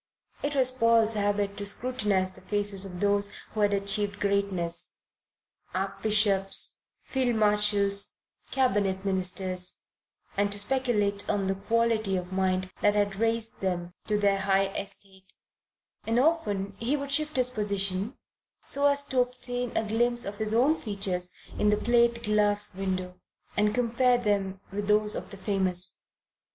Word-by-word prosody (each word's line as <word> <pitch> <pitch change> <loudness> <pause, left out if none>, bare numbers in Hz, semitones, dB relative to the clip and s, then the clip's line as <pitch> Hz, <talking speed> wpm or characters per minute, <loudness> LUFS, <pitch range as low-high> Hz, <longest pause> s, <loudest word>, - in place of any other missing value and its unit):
It 290 0 -1
was 260 -2 +5
Paul's 230 -3 +3
habit 205 -1 -1
to 205 - -4
scrutinize 205 -5 0
the - - -9
faces 200 0 -1
of 180 -2 -8
those 205 0 +2 0.2
who 215 - -4
had 205 -1 +3
achieved 200 0 0
greatness, 200 -4 0 0.8
Archbishops, 195 0 +2 0.2
Field 255 -3 -1
Marshals, 210 -2 +3 0.3
Cabinet 200 -7 0
Ministers, 185 -1 +1 0.5
and 205 0 +1
to 205 - +2
speculate 210 -3 0
on 200 -1 0
the 190 - +1
quality 220 0 0
of 180 0 -6
mind 185 0 0
that 205 0 +3
had 205 -1 0
raised 225 +1 -1
them 175 -2 -2
to 210 - +1
their 200 -1 +2
high 195 0 +2
estate; 195 -1 -7 0.7
and 225 +1 +1
often 210 -11 0
he 255 +6 0
would 280 0 -6
shift 305 +1 0
his 250 -1 +2
position, 200 0 -1 0.5
so 285 +1 +2
as 285 0 +3
to 260 -2 -1
obtain 245 0 -2
a 220 - 0
glimpse 240 +2 +1
of 205 +1 -6
his 215 -1 +1
own 255 +8 +3
features 195 - -2 0.3
in 210 - +3
the 210 - +3
plate 235 0 +2
glass 210 -1 +2
window, 185 -1 -4 0.4
and 210 +1 +1
compare 245 +1 +2
them 200 -4 -1
with 205 +1 -4
those 210 0 +2
of - - -6
the 200 - -7
famous. 190 -2 -2
205 Hz, 145 wpm, -27 LUFS, 195-230 Hz, 0.8 s, was